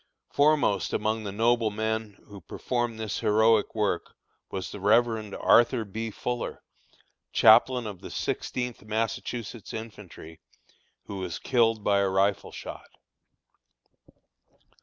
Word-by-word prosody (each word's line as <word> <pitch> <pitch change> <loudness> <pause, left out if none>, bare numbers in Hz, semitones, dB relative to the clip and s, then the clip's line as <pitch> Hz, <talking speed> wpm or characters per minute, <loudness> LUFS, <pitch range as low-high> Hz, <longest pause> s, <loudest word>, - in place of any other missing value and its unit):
Foremost 145 -10 +2
among 110 +1 -1
the 100 - -3
noble 115 +2 +2
men 110 0 -3
who 100 -2 -12
performed 120 +6 -3
this 110 -2 -3
heroic 110 +1 +3
work 105 -5 -1 0.3
was 95 -2 -5
the 105 - -8
Rev. 110 0 +2
Arthur 120 -1 +4
B. 110 +3 -5
Fuller, 120 +3 -4 0.7
chaplain 125 -2 +5
of 100 -4 -7
the - - -8
Sixteenth 125 -2 -3
Massachusetts 110 +1 -4
infantry, 100 -7 -10 0.7
who 100 - -7
was 90 -3 -4
killed 115 -4 +1
by 100 -1 +3
a 100 -1 +2
rifle 95 +1 +1
shot. - - -9
110 Hz, 115 wpm, -27 LUFS, 100-115 Hz, 0.7 s, chaplain